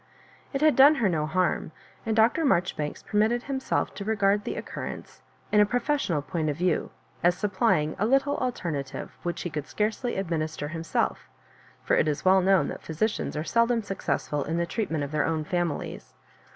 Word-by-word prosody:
It 275 - -2
had 310 -1 +5
done 285 +3 +8
her 235 -7 +2
no 155 -4 0
harm, 180 0 0 0.4
and 220 - +1
Dr. 225 +9 +4
Marjoribanks 170 - 0
permitted 220 +3 +1
himself 270 -1 -1
to 200 - -6
regard 205 -1 +2
the - - -3
occurrence - - -7 0.3
in 210 - +4
a 210 - +7
professional 245 - 0
point 160 -2 -2
of 145 - -2
view, 175 -1 0 0.3
as 175 +1 +3
supplying 195 -7 +1
a 210 - +2
little 275 +3 +2
alternative 170 - -4
which 175 0 -3
he 175 - -4
could 150 -1 -4
scarcely 220 +3 -1
administer 160 -5 -2
himself; 165 0 -2 0.5
for - - +2
it - - +2
is 150 +2 -2
well 190 +1 +6
known 190 0 +3
that - - -6
physicians 165 +1 -2
are 155 - -1
seldom 230 +4 +2
successful 150 -7 -2
in 160 +4 -2
the 170 - +1
treatment 165 -7 -2
of 140 - -5
their 150 -1 +1
own 160 -1 -1
families. 175 -1 -3
185 Hz, 180 wpm, -27 LUFS, 155-225 Hz, 0.5 s, done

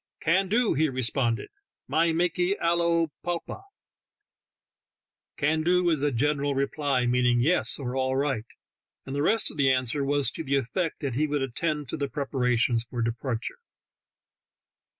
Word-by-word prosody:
"Can 185 +4 +2
do," 230 +2 +2
he 155 +2 +2
responded. 125 -2 0 0.4
"My 165 +1 +2
makee 175 +3 0
alio 170 -1 +1
plopa." 175 - -4 1.8
"Can 155 +2 +1
do" 180 +2 +2
is 155 -4 0
a 145 0 +1
general 145 +2 0
reply, 140 -2 0
meaning 125 0 +2
"Yes," 160 +9 +2
or 130 -2 -4
"All 130 0 0
right," 135 -5 -1 0.6
and 135 - -5
the 145 - 0
rest 220 +9 +3
of - - -13
the 135 -2 +4
answer 130 +2 +1
was 140 0 +2
to 165 - -6
the 140 -2 0
effect 155 +6 -2
that 140 -4 -2
he 150 +5 +1
would 145 -2 -1
attend 150 +3 -2
to - - -3
the 140 -1 -2
preparations 125 -5 0
for 120 0 -4
depar 115 +1 -2
ture. - - -6
145 Hz, 155 wpm, -26 LUFS, 130-165 Hz, 1.8 s, the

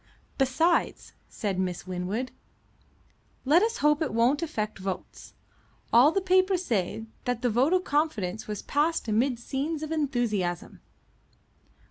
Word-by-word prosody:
"Besides," 320 +6 +1 0.2
said 195 -3 -3
Miss 180 -2 -2
Winwood, 185 +7 -3 1.1
"let 310 +7 +5
us 455 +2 0
hope 300 +1 +4
it 290 -8 -1
won't 250 +6 +3
affect 215 -11 -3
votes. 190 -1 -6 0.6
All 250 +6 +7
the 390 - 0
papers 370 0 +2
say 220 - -1 0.2
that 245 -1 -2
the 245 - +2
vote 255 +8 +2
of 365 0 +2
confidence 225 - -1
was 210 -2 -5
passed 305 -1 0
amid 235 +4 +1
scenes 290 +6 -3
of 310 - -5
enthusiasm." 240 - -1
255 Hz, 130 wpm, -27 LUFS, 215-315 Hz, 1.1 s, All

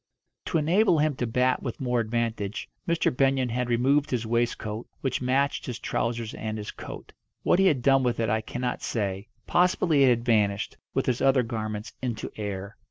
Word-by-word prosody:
To 165 - 0
enable 170 +4 +3
him 150 -1 +2
to 125 - -1
bat 125 +2 +2
with 120 - -5
more 125 -2 0
advantage, 115 -3 -2 0.2
Mr. 170 -6 +1
Benyon 135 -1 +2
had 125 +1 -1
removed 135 +5 +2
his 120 -3 -1
waistcoat, 115 -1 -1
which 135 - -1
matched 135 +3 +1
his 125 -3 -3
trousers 115 -2 -2
and 110 0 -4
his 105 -1 -5
coat. - - -9 0.3
What 175 - +3
he 195 - +5
had 135 -8 +2
done 135 0 +5
with 120 -2 0
it 115 - +1
I 110 +1 +1
cannot 125 +2 -3
say; 100 -2 -2 0.2
possibly 175 -4 +3
it 130 - +6
had 120 -1 +1
vanished, 105 -4 +1 0.2
with - - +1
his 125 0 0
other 135 -1 +4
garments, 110 -2 -4
into 120 -3 -3
air. 100 -1 -5
120 Hz, 185 wpm, -27 LUFS, 110-135 Hz, 0.3 s, it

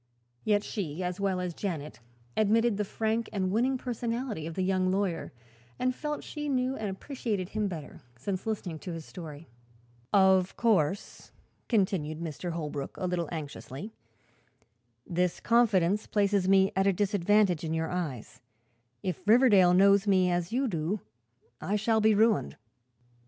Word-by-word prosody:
Yet 210 -1 +2
she, 185 -6 -4
as 180 +1 -3
well 195 -2 0
as 180 -1 -3
Janet, 160 -8 -5 0.4
admitted 220 +1 +3
the 210 - 0
frank 220 +3 -1
and 190 -2 -1
winning 250 +5 +2
personality 235 - -3
of 165 - -6
the 185 - 0
young 185 0 +1
lawyer 190 -3 -1 0.5
and 255 0 0
felt 300 +3 -4
she 295 -1 -5
knew 260 -1 0
and 215 -4 -3
appreciated 205 -3 -3
him 215 -1 -1
better 160 -6 -7 0.2
since 185 - -4
listening 185 -7 -3
to 180 - -6
his 165 -2 -7
story. 160 -3 -9 0.6
"Of 190 -2 +4
course," 200 -5 0 0.4
continued 185 -8 +1 0.3
Holbrook, 155 -5 -4
a 185 - -3
little 175 -3 -1
anxiously, 155 - -7 1.1
"this 180 0 0
confidence 210 -4 +3
places 200 -2 +1
me 195 0 +5
at 190 +1 +2
a 195 - +4
disadvantage 200 -2 +2
in 160 0 -2
your 160 0 -2
eyes. 155 -10 -4 0.6
If 185 -4 -3
Riverdale 210 -6 +6
knows 200 +2 +5
me 185 -2 +4
as 175 0 -1
you 260 +3 +1
do 180 +1 -2 0.6
I 205 - -1
shall 220 +1 +2
be 215 0 +4
ruined." 210 - +2
195 Hz, 145 wpm, -29 LUFS, 175-215 Hz, 1.1 s, Riverdale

